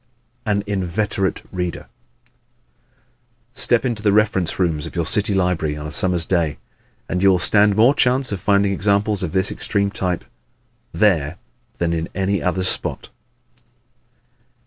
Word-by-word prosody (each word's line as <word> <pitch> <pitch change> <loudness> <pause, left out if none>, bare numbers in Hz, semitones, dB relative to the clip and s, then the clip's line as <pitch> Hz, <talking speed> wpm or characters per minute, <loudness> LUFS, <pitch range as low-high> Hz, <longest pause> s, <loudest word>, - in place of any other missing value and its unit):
An 100 -1 +1
Inveterate 100 0 -1
Reader 90 -2 -4 1.7
¶ - - -36
Step 120 -2 +3
into 115 -4 -2
the 105 -1 +2
reference 100 -4 +1
rooms 80 -5 -1
of - - -11
your 85 -2 -1
city 100 +4 +1
library 90 -5 0
on 75 - -7
a 75 - -6
summer's 90 +1 +2
day 85 -5 0 0.5
and 90 - -2
you 100 - +5
will 95 - +4
stand 100 +3 +4
more 115 +6 +5
chance 130 -2 +1
of 100 - -3
finding 100 +1 +2
examples 100 +1 0
of 90 -4 -3
this 95 +1 0
extreme 100 -1 -1
type 90 -3 -3 0.7
there 85 -3 +1 0.4
than 85 -1 0
in 80 0 -3
any 95 +1 0
other 90 +1 -1
spot. 95 - -1
95 Hz, 145 wpm, -20 LUFS, 85-105 Hz, 1.7 s, you